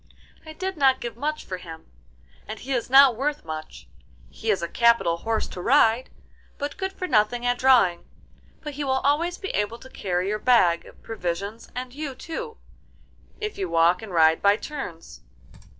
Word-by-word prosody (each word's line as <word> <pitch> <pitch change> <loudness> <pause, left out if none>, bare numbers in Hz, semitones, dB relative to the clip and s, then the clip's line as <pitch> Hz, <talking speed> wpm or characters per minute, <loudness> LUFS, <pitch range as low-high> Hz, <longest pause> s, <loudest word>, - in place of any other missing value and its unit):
'I 315 - -8
did 375 +2 -4
not 265 -2 +4
give 235 -1 -6
much 300 +5 -3
for 185 - -5
him, 165 -3 -11 0.6
and 215 - -6
he 270 +4 -4
is 245 -2 -2
not 270 -2 +7
worth 285 - -2
much; 155 - -8 0.4
he 225 - -5
is 195 -5 +1
a - - -1
capital 235 -4 +3
horse 225 +5 -2
to 180 - -7
ride, 245 +1 +3 0.5
but 290 0 -4
good 380 0 -3
for 370 - -5
nothing 240 -1 +2
at 245 0 +1
drawing; 250 -10 +4 0.6
but 300 -1 -6
he 290 +1 -4
will 265 -1 +1
always 330 +5 +1
be 390 - -6
able 210 +3 -1
to 260 +2 -14
carry 180 -1 -2
your 210 +1 -1
bag 185 -10 +3
of - - -17
provisions 200 +1 -5
and 250 0 -5
you 285 -2 -5
too, 450 - -7 0.8
if 425 -1 -5
you 190 -3 -2
walk 170 +2 +3
and 220 -3 -9
ride 160 -2 +4
by 200 0 +5
turns. 215 - -8
235 Hz, 180 wpm, -24 LUFS, 185-285 Hz, 0.8 s, not